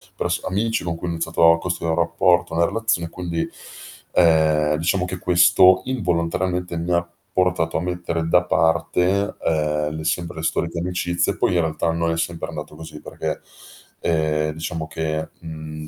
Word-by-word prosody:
pers - - -1
amici 110 +1 -1
con 85 -1 -2
cui 85 - -6
ho - - -1
iniziato 80 0 +3
a 85 - +3
costruire 85 -2 -2
un - - -1
rapporto, 85 0 +2
una 85 +1 +3
relazio 110 -3 0
e - - -8
quindi, 85 -2 -3 0.7
ehm, 80 -3 +4
diciamo 90 +3 +1
che 90 0 -5
questo, 90 +1 +5
involontariamente, 90 -5 -1
mi 85 +2 -1
ha 85 0 +2 0.3
portato 90 -3 +1
a - - -1
mettere 85 -2 -2
da 90 +1 +4
parte, 90 +5 +1
ehm, 75 -1 0
le 80 - -5
sempre 85 +1 -2
le 80 - -5
storiche 85 0 -1
amicizie. 85 -1 -1
Poi, - - +1
in 85 - +4
realtà, 80 0 -1
non 85 0 0
sempre 85 0 -3
è - - -9
andato - - -7
così 80 -2 -10
perché, - - -4 0.6
ehm, 75 -1 +1
diciamo 80 0 -4
che, 80 0 -3
mhmm, 80 -1 -8
85 Hz, 170 wpm, -22 LUFS, 80-90 Hz, 0.7 s, questo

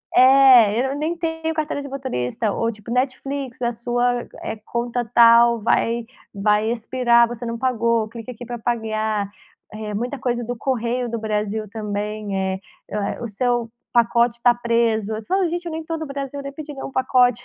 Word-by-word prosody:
É, 255 -3 +7
eu - - -3
nem 320 +3 -2
tenho 325 -1 -2
carteira 305 -2 -2
de 280 - -7
motorista 225 - -2
ou 230 +2 0
tipo, 210 +1 -13
Netflix: 260 0 -2
"A 240 0 +1
sua, 240 +1 0 0.2
eh, - - -4
conta 240 +1 -2
tal 235 0 +7
vai 230 +1 +1 0.3
vai 210 +2 +2
expirar 235 0 +3
você 240 0 -6
não 230 0 -3
pagou, 230 -3 +1
clique 230 +2 -8
aqui 245 +1 -9
pra 240 0 -5
pagar", 220 -3 -1 0.4
eh, 215 -1 -5
muita 245 +6 -3
coisa 240 -1 -1
do 245 +2 -4
Correio 245 0 -1
do 230 -1 -3
Brasil 215 0 -2
também, 210 -1 -4
eh 190 0 -1 0.3
eh, 210 +2 -3
"O 235 - -3
seu 240 +2 -1 0.2
pacote 235 0 +3
tá 245 -1 +6
preso", 230 -3 +1
eu 215 0 -5
falo: 375 -2 +1
"Gente 350 +1 -4
eu 335 - -4
nem 320 0 -4
tô 325 +1 -3
no 315 - -4
Brasil, 275 0 -5
nem 275 0 -7
pedi 300 0 -8
nenhum 270 0 -7
pacote", 250 -2 +2
235 Hz, 180 wpm, -22 LUFS, 220-260 Hz, 0.4 s, É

